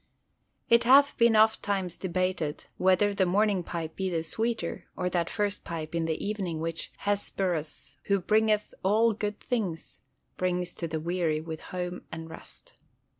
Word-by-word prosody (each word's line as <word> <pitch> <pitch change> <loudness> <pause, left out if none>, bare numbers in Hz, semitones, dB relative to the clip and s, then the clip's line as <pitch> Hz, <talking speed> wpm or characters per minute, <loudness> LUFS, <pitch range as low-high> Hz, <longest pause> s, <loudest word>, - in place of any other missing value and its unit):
It 235 0 +5
hath 275 +4 +6
been 230 -1 +4
ofttimes 200 -4 +2
debated 185 -4 -2
whether 190 +2 +3
the 190 -2 +2
morning 200 +1 +2
pipe 165 -2 -5
be 190 -1 -1
the 165 -2 -1
sweeter, 225 0 -2
or 180 0 -1
that 170 -2 0
first 205 -1 -1
pipe 160 -1 -5
of 165 -1 0
the 160 +3 -2
evening 195 -6 -2
which 165 0 -2
"Hesperus, 190 -6 -2
who 200 -1 +2
bringeth 215 +2 +2
all 220 +4 +3
good 210 0 -3
things," 195 -10 -3 0.4
brings 180 -1 -1
to 170 - -4
the 160 0 -3
weary 165 -1 0
with 160 0 -6
home 180 0 -5
and 160 0 -7
rest. 160 - -13
185 Hz, 155 wpm, -28 LUFS, 165-210 Hz, 0.4 s, hath